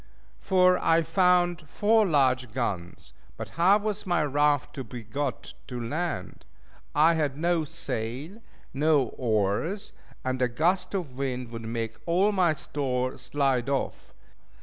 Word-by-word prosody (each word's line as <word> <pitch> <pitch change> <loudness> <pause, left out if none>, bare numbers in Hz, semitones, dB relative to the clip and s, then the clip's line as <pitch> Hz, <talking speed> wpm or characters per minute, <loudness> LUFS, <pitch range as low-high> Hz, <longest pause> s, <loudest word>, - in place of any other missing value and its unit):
For 185 -1 +4
I 165 0 +3
found 175 -1 +2
four 215 +3 +3
large 130 -6 +2
guns. 95 -8 -4 0.2
But - - -6
how 180 +5 +4
was 210 -1 -4
my 175 -3 +2
raft 145 -1 +1
to 135 - -5
be 120 0 -8
got 135 +5 -4
to 125 -2 -5
land? 155 +8 -4 0.5
I 155 +3 +5
had 150 -4 -1
no 170 0 +1
sail, 135 - -5 0.3
no 145 -3 +2
oars; 120 - -1 0.3
and 130 0 -1
a 125 - +4
gust 170 +11 0
of 145 -9 -4
wind 125 -3 -3
would 115 -1 -6
make 115 0 -4
all 185 +5 +3
my 180 -5 +3
store 130 -3 -2
slide 130 -1 0
off. 140 -1 -3
145 Hz, 140 wpm, -27 LUFS, 125-175 Hz, 0.5 s, I